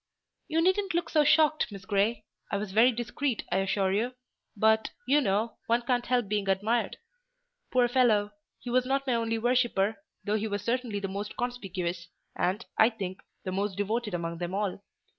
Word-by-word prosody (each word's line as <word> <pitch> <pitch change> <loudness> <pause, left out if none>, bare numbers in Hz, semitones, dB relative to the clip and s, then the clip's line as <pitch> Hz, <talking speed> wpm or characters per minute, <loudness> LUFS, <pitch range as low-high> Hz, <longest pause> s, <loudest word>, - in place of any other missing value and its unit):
You 320 +1 +1
needn't 375 0 +2
look 345 - -1
so 305 -2 +4
shocked, 310 -3 +3
Miss 195 -2 -9
Grey; 210 +2 +1 0.3
I 200 - +1
was 200 -1 -4
very 225 +5 +5
discreet, 240 +2 -2
I - - +2
assure 195 0 +1
you, 235 +6 0 0.4
but, 220 +1 +3 0.2
you 285 +4 +4
know, 215 0 0
one 235 +1 +2
can't 245 0 0
help 245 -3 +1
being 205 -1 -1
admired. 210 +5 +1 0.7
Poor 250 -1 +3
fellow! 225 -5 +3 0.3
He 245 - -7
was 255 +1 +3
not 275 +1 0
my 260 - +1
only 230 -1 0
worshipper; 230 -3 +1 0.3
though 210 +1 +1
he 220 +1 -2
was 205 -1 -3
certainly 235 -2 -1
the 200 - -3
most 200 +2 -5
conspicuous, 185 -8 -3 0.3
and, 195 +6 -1
I 220 - +7
think, 195 -5 -6 0.2
the 185 - -3
most 195 0 -2
devoted 210 0 -1
among 170 -1 -4
them 175 +1 -3
all. 200 -1 -2
220 Hz, 180 wpm, -29 LUFS, 195-245 Hz, 0.7 s, I